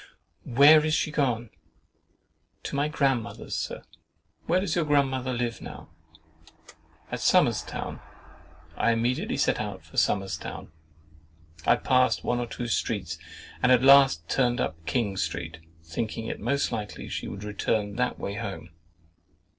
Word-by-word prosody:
"Where 145 +5 +7
is 155 0 +1
she 155 - 0
gone?"—"To 125 -1 -6
my 145 +1 +1
grandmother's, 135 -6 -1
Sir." - - -4 0.6
"Where 180 +2 +3
does 195 - -1
your 170 - +2
grandmother 135 -3 +1
live 120 -2 -2
now?"—"At 80 0 -13
Somers' - - +3
Town." - - -6 0.8
I 115 - +2
immediately 120 +2 -1
set - - +1
out - - -6
to - - -12
Somers' 95 -4 0
Town. - - -8 1.0
I - - +6
passed 130 0 +2
one 120 - 0
or 120 - -2
two 120 - -5
streets, 115 - -2 0.4
and 125 - +4
at 125 0 +5
last 135 -11 +6
turned 125 +2 +1
up 80 +1 -3
King 100 +1 0
Street, 85 -1 -3 0.2
thinking 110 +7 -4
it - - -4
most 140 +6 0
likely 105 -3 -5
she - - -4
would 100 +1 -7
return 105 0 -1
that - - 0
way 100 - -4
home. 100 -6 -6
120 Hz, 140 wpm, -27 LUFS, 100-135 Hz, 1.0 s, Where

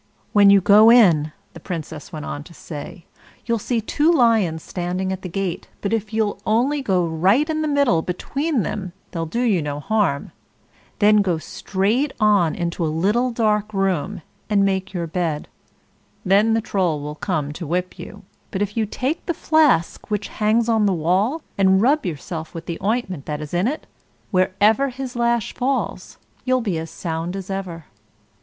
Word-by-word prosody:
"When 205 -1 +7
you 200 -1 +6
go 210 +4 +7
in," 170 -11 +5 0.2
the - - -10
Princess 160 -4 -6
went 155 -3 -6
on 145 - -5
to 170 - -14
say, 160 +2 -9 0.4
"you'll 230 -1 0
see 235 +3 -1
two 295 +9 +2
lions 220 - +2
standing 185 +1 -3
at 190 - -6
the 185 - -6
gate; 185 -1 -3
but 200 - -2
if 220 -2 -2
you'll 220 -2 -1
only 260 +7 +1
go 185 -8 +1
right 185 - +2
in 310 -1 -1
the 310 - 0
middle 280 - +2
between 270 - -2
them 190 -4 -4 0.2
they'll 165 -2 -3
do 235 +10 -1
you 205 -8 +2
no 145 -1 -4
harm. 195 -5 0 0.7
Then 210 0 +5
go 190 -5 +2
straight 210 - -1
on 205 -7 +3
into 170 0 -2
a - - +1
little 205 +11 +1
dark 215 -3 0
room, 190 -1 -1 0.3
and 200 -2 +3
make 190 0 -1
your 175 -3 -3
bed. 165 -2 -2 0.8
Then 210 +4 +4
the 225 - +1
Troll 180 -7 0
will 150 +1 -5
come 150 -3 -2
to 165 +1 -7
whip 180 +3 -2
you; 205 - -10 0.3
but 195 +1 -1
if 205 0 -5
you 220 -2 0
take 265 - -2
the 340 - -1
flask 295 - +2
which 210 -1 -2
hangs 220 +2 +1
on 220 -3 +3
the 195 - +2
wall, 195 - 0 0.2
and 190 0 +5
rub 270 +2 +2
yourself 160 0 -6
with 165 0 -6
the 170 - -5
ointment 195 - -2
that's 150 0 -5
in 175 +5 +1
it, 300 +5 -3 0.5
wherever 205 +7 +3
his 255 0 -6
lash 235 -2 0
falls, 265 +1 -2 0.3
you'll 255 0 +2
be 200 -9 -2
as 160 0 -6
sound 165 +2 -4
as 195 0 -6
ever. 180 -5 -5
195 Hz, 180 wpm, -21 LUFS, 170-225 Hz, 0.8 s, When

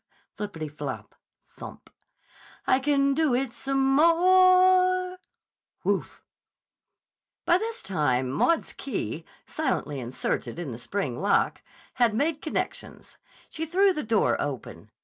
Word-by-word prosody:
(Floppity 165 -7 -5
flop! - - -6 0.3
Thump!) - - -12 0.8
I 260 - +3
can 275 0 +2
do 300 -3 +2
it 255 -1 -2
some 270 0 0
more!" 370 +2 +4 0.6
(Whoof!) - - -2 1.2
By 345 +1 +4
this 455 +2 -4
time 130 -8 0
Maud's 330 - +1
key, - - -5 0.2
silently 150 - -2
inserted 120 0 -3
in 170 -6 -5
the 115 - -7
spring 140 -5 -3
lock, 200 +1 +1 0.4
had 230 -3 +4
made 300 +5 0
connections. 310 - -5 0.3
She 320 0 -5
threw 380 +4 +3
the 305 - -3
door 220 -3 +1
open. 140 -4 -6
275 Hz, 115 wpm, -26 LUFS, -, 1.2 s, more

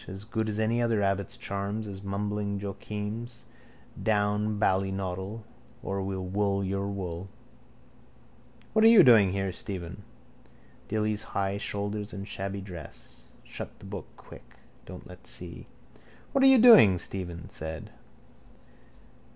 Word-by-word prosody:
As 95 +1 -7
good 110 0 -2
as 105 - -2
any 110 +2 +1
other 115 -3 +2
abbot's 100 0 -1
charms, 100 +2 -3
as 100 -1 -7
mumbling 100 0 -2
Joachim's. 105 +4 -5 0.6
Down, 105 0 +1
baldynoddle, 95 +1 -1 0.4
or 95 0 -2
we'll 95 -1 -3
wool 100 +1 0
your 100 +1 -1
wool. 95 -2 -5 1.4
—What 220 - +4
are - - +9
you 230 -2 +9
doing 110 -7 +7
here, 95 0 -1
Stephen? 90 -2 -5 0.9
Dilly's 110 0 0 0.2
high 100 0 0
shoulders 100 0 -3
and 100 +1 -6
shabby 100 0 -4
dress. 85 -9 -11 0.2
Shut - - -8
the - - -14
book 95 -2 -6
quick. - - -15 0.3
Don't - - -9
let - - -12
see. - - -7 0.6
—What 270 - +3
are - - +8
you 265 -1 +8
doing? 220 - +9
Stephen 85 -1 -6
said. 80 -2 -7
100 Hz, 130 wpm, -28 LUFS, 95-105 Hz, 1.4 s, are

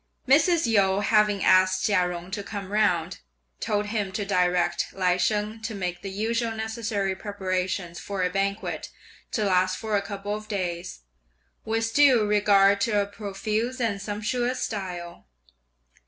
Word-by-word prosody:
Mrs. 320 +5 +4
Yu, 200 -3 +3
having 210 -2 +2
asked 185 0 +4
Chia 185 -5 +2
Jung 175 +1 -7
to 205 +1 -3
come 200 -1 -7
round, 185 -5 +1 0.4
told 210 0 -1
him 210 -2 -2
to 205 +1 -2
direct 180 -2 +1
Lai 180 -2 +2
Sheng 210 +4 -1
to 220 0 -4
make 180 -2 -4
the 195 - -5
usual 225 +3 -1
necessary 220 -3 -2
preparations 185 -3 -3
for 195 -2 -3
a 180 - +1
banquet 195 +2 -2 0.4
to 215 - 0
last 185 -1 +2
for 220 -2 -2
a 200 - +2
couple 200 0 -5
of 215 0 -6
days, 180 - -4 0.6
with 225 +1 -1
due 265 -7 +5
regard 200 -1 +4
to 220 -5 +2
a 200 - +1
profuse 215 +4 -3
and 215 -5 -1
sumptuous 230 +5 -2
style. 180 - -5
205 Hz, 150 wpm, -26 LUFS, 185-220 Hz, 0.6 s, due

